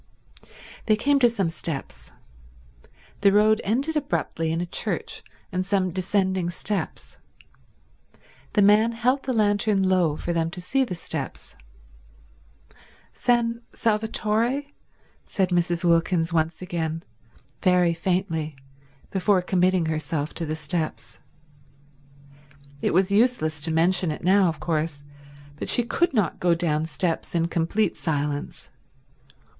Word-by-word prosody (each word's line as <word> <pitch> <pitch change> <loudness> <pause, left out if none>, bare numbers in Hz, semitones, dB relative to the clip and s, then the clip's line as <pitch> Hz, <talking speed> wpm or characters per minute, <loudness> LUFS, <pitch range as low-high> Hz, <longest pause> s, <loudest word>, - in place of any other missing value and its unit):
They 215 - +5
came 280 +6 +2
to 245 -2 +5
some 200 -7 -1
steps. 140 - -6 1.1
The 200 -1 +5
road 215 +2 +4
ended 270 +10 0
abruptly 165 - -1
in 165 - -1
a 175 - -1
church 170 - -2 0.3
and 185 0 -1
some 190 -1 0
descending 185 0 0
steps. 195 +3 -4 1.4
The 205 - +4
man 215 +3 +5
held 250 +4 +1
the 265 - -3
lantern 205 -3 +2
low 175 -5 +2
for 175 - -3
them 165 -1 0
to 180 +2 -8
see 265 +10 +1
the 195 -8 -4
steps. 170 - -5 1.6
"San 235 -1 +1
Salvatore?" 225 +3 +1 0.6
said 190 -2 0
Mrs. 175 -1 0
Wilkins 170 0 +2
once 165 +2 0
again, 165 -2 -3 0.6
very 180 -3 +3
faintly, 165 -3 -2 0.6
before 190 -1 +2
committing 185 -1 +2
herself 155 -1 -2
to 165 - -3
the 155 - -2
steps. 160 +1 -4 1.6
It - - +1
was 190 +1 +3
useless 200 -9 +2
to 160 +2 +2
mention 175 +2 +3
it 150 - -5
now, 190 +1 +4
of 165 -2 -2
course, 155 -3 -2 0.5
but - - -5
she 240 - +4
could 340 +9 +1
not 210 - 0
go 175 -1 +3
down 160 -2 0
steps 165 +3 -2
in 170 0 +1
complete 175 +5 0
silence. 145 -2 -3
180 Hz, 125 wpm, -24 LUFS, 165-210 Hz, 1.6 s, They